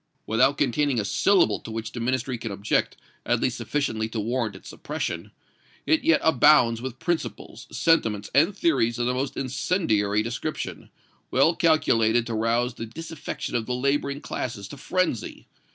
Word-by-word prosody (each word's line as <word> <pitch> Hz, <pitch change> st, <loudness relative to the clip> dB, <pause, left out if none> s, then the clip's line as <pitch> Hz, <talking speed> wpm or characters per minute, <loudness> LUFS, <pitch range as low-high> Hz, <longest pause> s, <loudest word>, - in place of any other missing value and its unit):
"Without 125 Hz, +5 st, +3 dB
containing 140 Hz, -1 st, +1 dB
a 105 Hz, -, -1 dB
syllable 175 Hz, -, +3 dB
to -, -, -10 dB
which 110 Hz, -1 st, -5 dB
the 120 Hz, -, -6 dB
Ministry 130 Hz, +2 st, -1 dB
can 115 Hz, -2 st, -5 dB
object, 100 Hz, +1 st, -1 dB, 0.3 s
at -, -, +1 dB
least -, -, -1 dB
sufficiently 110 Hz, -7 st, -2 dB
to 110 Hz, -, -4 dB
warrant 115 Hz, -1 st, -1 dB
its 95 Hz, -, -13 dB
suppression, -, -, -4 dB, 0.6 s
it 160 Hz, -, +2 dB
yet 165 Hz, -1 st, +4 dB
abounds 125 Hz, -6 st, +5 dB
with 130 Hz, -1 st, -6 dB
principles, 130 Hz, -8 st, -4 dB
sentiments 115 Hz, -11 st, +1 dB
and 165 Hz, +9 st, +3 dB
theories 120 Hz, -, +2 dB
of 120 Hz, -, 0 dB
the 125 Hz, -, +1 dB
most 130 Hz, +2 st, -3 dB
incendiary 115 Hz, -, 0 dB
description, 115 Hz, 0 st, -5 dB, 0.4 s
well 165 Hz, -, +3 dB
calculated 120 Hz, -9 st, +3 dB
to 115 Hz, -, -4 dB
rouse 115 Hz, +2 st, +1 dB
the 115 Hz, -, -7 dB
disaffection 160 Hz, +4 st, -6 dB
of 115 Hz, -2 st, -1 dB
the 125 Hz, -, -1 dB
laboring 140 Hz, +2 st, 0 dB
classes 105 Hz, -5 st, -5 dB
to -, -, -8 dB
frenzy. 175 Hz, -, -2 dB
120 Hz, 160 wpm, -25 LUFS, 115-145 Hz, 0.6 s, abounds